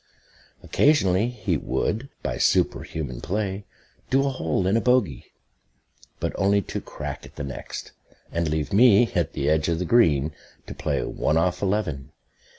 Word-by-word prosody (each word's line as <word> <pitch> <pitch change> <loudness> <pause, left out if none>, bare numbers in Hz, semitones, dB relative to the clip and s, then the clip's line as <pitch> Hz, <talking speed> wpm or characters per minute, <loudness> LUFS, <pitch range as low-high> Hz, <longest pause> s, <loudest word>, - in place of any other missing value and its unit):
Occasionally 110 -9 +3
he 105 -8 -1
would, 115 - -2
by - - -3
superhuman 65 -6 0
play, 100 +3 -3 0.4
do 135 +1 +3
a - - +2
hole 90 - -1
in 100 +5 +3
bogey; 115 - +1 0.9
but - - -2
only 100 +1 +3
to - - -5
crack - - -7
at - - -14
the 75 - -5
next, 70 -2 -7 0.4
and 85 -1 -1
leave 80 +4 -2
me, 115 +1 +6
at 85 -3 0
the 70 -2 -2
edge 80 +1 +2
of 85 - +1
the 90 - -2
green, 80 - +3 0.3
to - - -7
play - - -2
"one 80 - 0
off 90 +2 +1
eleven." 95 - -1
95 Hz, 155 wpm, -24 LUFS, 80-110 Hz, 0.9 s, me